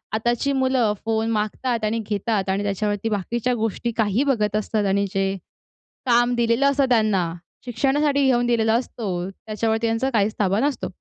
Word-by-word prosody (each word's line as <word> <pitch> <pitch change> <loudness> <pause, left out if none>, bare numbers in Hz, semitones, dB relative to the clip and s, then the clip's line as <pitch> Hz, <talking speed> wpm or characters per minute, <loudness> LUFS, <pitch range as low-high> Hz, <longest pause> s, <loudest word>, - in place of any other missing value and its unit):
आताची 240 +5 0
मुलं 260 -5 +2
फोन 225 0 0
मागतात 225 +2 -1
आणि 220 +2 0
घेतात. 205 -1 -1
आणि 195 +2 0
त्याच्यावरती 205 +2 -1
बाकीच्या 235 +4 -1
गोष्टी 225 +1 -2
काहीही 220 +3 +2
बघत 215 -7 0
असतात 215 0 0
आणि 200 +1 +1
जे 195 -1 0 0.7
काम 240 0 +3
दिलेलं 235 +2 +2
असतं 280 0 +2
त्यांना, 210 -8 +2 0.3
शिक्षणासाठी 275 +4 +1
घेऊन 245 -2 +3
दिलेला 225 -2 +2
असतो, 200 -7 -2
त्याच्यावरती 220 +3 -2
त्यांचा 225 +4 0
काहीच 215 -4 +1
ताबा 200 0 +2
नसतो. 285 +2 -1
225 Hz, 155 wpm, -22 LUFS, 210-240 Hz, 0.7 s, काम